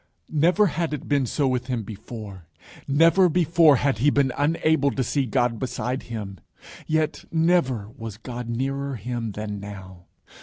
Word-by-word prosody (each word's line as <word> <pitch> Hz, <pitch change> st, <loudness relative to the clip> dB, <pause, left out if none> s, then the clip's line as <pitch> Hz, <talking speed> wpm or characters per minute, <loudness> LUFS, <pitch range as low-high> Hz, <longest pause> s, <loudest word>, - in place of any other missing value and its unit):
_ -, -, -40 dB, 0.3 s
Never 175 Hz, +7 st, +4 dB
had 165 Hz, -3 st, -1 dB
it 145 Hz, -, -9 dB
been 140 Hz, -3 st, +1 dB
so 140 Hz, +3 st, 0 dB
with 125 Hz, -1 st, -1 dB
him 125 Hz, -4 st, -2 dB
before. 105 Hz, -3 st, -9 dB, 0.4 s
Never 165 Hz, +6 st, +5 dB
before 165 Hz, -2 st, +5 dB
had 135 Hz, -4 st, 0 dB
he 145 Hz, +5 st, +4 dB
been 140 Hz, -2 st, +2 dB
unable 155 Hz, 0 st, +2 dB
to 130 Hz, +1 st, -1 dB
see 135 Hz, 0 st, 0 dB
God 120 Hz, -2 st, 0 dB
beside 130 Hz, 0 st, -3 dB
him. 105 Hz, -4 st, -6 dB, 0.5 s
Yet 155 Hz, 0 st, 0 dB
never 160 Hz, -, +2 dB
was 115 Hz, -2 st, -7 dB
God 120 Hz, 0 st, -7 dB
nearer 135 Hz, +3 st, -2 dB
him 115 Hz, 0 st, -4 dB
than 105 Hz, -1 st, -5 dB
now. 95 Hz, -3 st, -10 dB
130 Hz, 160 wpm, -24 LUFS, 110-150 Hz, 0.5 s, Never